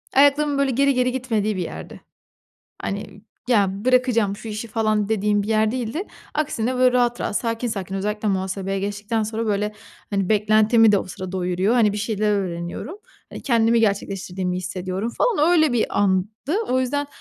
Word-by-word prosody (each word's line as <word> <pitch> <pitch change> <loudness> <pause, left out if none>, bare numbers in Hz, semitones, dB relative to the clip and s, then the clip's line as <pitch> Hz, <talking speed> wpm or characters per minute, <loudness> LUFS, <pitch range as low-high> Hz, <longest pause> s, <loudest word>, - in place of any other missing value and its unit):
ayaklarımın, 285 +1 +4
böyle, 275 -1 +2
geri 275 +3 +3
geri 255 0 +1
gitmediği 225 -5 -1
bir - - -1
yerdi. - - -8 0.8
Hani, 200 0 -5 0.3
"Ya, 205 -6 +4 0.2
bırakacağım 250 -5 +2
şu 215 +2 -9
işi" 215 +2 -5
falan, 215 -2 0
dediğim 210 -1 +1
bir 205 - -6
yer 220 -1 +2
değildi. 250 +7 -3 0.3
Aksine, 255 -5 -1
böyle, 255 0 +4
rahat, 240 -1 +1
rahat - - -2
sakin, 230 +1 -2
sakin 195 -4 -4
özellikle 210 +2 -2
muhasebeye 195 0 -2
geçtikten 205 +3 -2
sonra, 220 +1 -3
böyle, 210 0 0 0.4
hani, 195 -3 0
beklentimi 215 +1 +4
de 200 - +4
o - - -5
sıra 185 0 -7
doyuruyor. 185 +4 0
Hani, 220 -4 +4
bir 210 - -3
şeyler 210 0 0
öğreniyorum. 185 - -3 0.3
Hani, - - -8
kendimi 230 -2 +3
gerçekleştirdiğimi 195 -3 -1
hissediyorum, 185 +4 -3
falan. 345 -9 +3
Öyle 315 -5 +4
bir 235 -2 0
andı. 190 -1 +2 0.4
O 255 +1 +2
yüzden, 285 +3 -1
215 Hz, 165 wpm, -22 LUFS, 200-245 Hz, 0.8 s, ayaklarımın